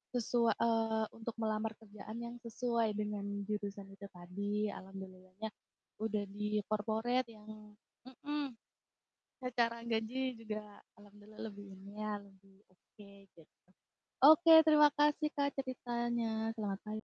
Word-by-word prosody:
sesua 235 -1 +3
eee, 225 -1 +2
untuk 225 0 -6
melamar 220 0 -1
kerjaan 215 0 -9
yang 235 0 -6
sesuai 235 -1 0
dengan 210 -1 -2 0.2
jurusan 205 -1 -4
itu 200 +1 -9
tadi. 205 +4 -2
Alhamdulillahnya 190 +1 -8 0.5
udah 215 -2 0
di 210 0 -1
corporate 225 +4 0
yang 215 -1 -12 0.3
mhm, 285 -1 -4 0.9
secara 235 -2 0
gaji 240 +3 -1
juga 215 -2 -6 0.2
alhamdulillah 205 +1 -15
lebih 205 0 -10
umayan, 205 +1 -5 0.2
lebih 195 +1 -24
oke 200 +2 -17 0.3
gitu. 165 - -16 0.8
Oke 315 +4 +9
terima 300 -1 +8
kasih, 295 +1 +3
Kak, 280 0 +1
ceritanya. 235 -4 -1
Selamat 205 -3 -2
pag - - -10
220 Hz, 115 wpm, -35 LUFS, 205-235 Hz, 0.9 s, Oke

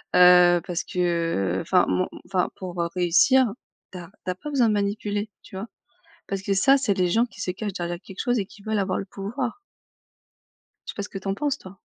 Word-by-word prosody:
heu, 180 -1 +7
parce 175 -2 -2
que, 180 - -5 0.6
heu, - - -2
enfin 180 +2 +3
mon 185 - +1 0.2
enfin 185 -2 0
pour, 180 -2 -4
heu, 170 - -1
réussir, 195 +9 +4 0.4
tu 185 - -8
as 170 -1 -10 0.2
tu 185 - 0
as - - -5
pas 300 - -7
besoin 260 -5 +3
de - - +2
manipuler, 205 +1 -1
tu - - -13
vois? 200 +4 -5 0.6
Parce 195 -1 -3
que 200 - -1
ça, 270 +8 +5
c'est 215 -7 +1
les 180 -1 +1
gens 225 +7 +3
qui 205 - -15
se 190 - -1
cachent 205 +2 -4
derrière 175 -2 -3
quelque 195 - -10
chose 245 -2 +1
et 200 - -1
qui 205 - -16
veulent 215 0 -1
avoir 190 -1 -1
le 195 - -5
pouvoir. 235 - -4 1.3
Je - - -4
sais - - -31
pas 200 - -3
ce - - -7
que - - -6
tu 195 - -8
en 195 - +1
penses 290 +1 -1
toi? 190 +1 -12
195 Hz, 235 wpm, -25 LUFS, 180-215 Hz, 1.3 s, heu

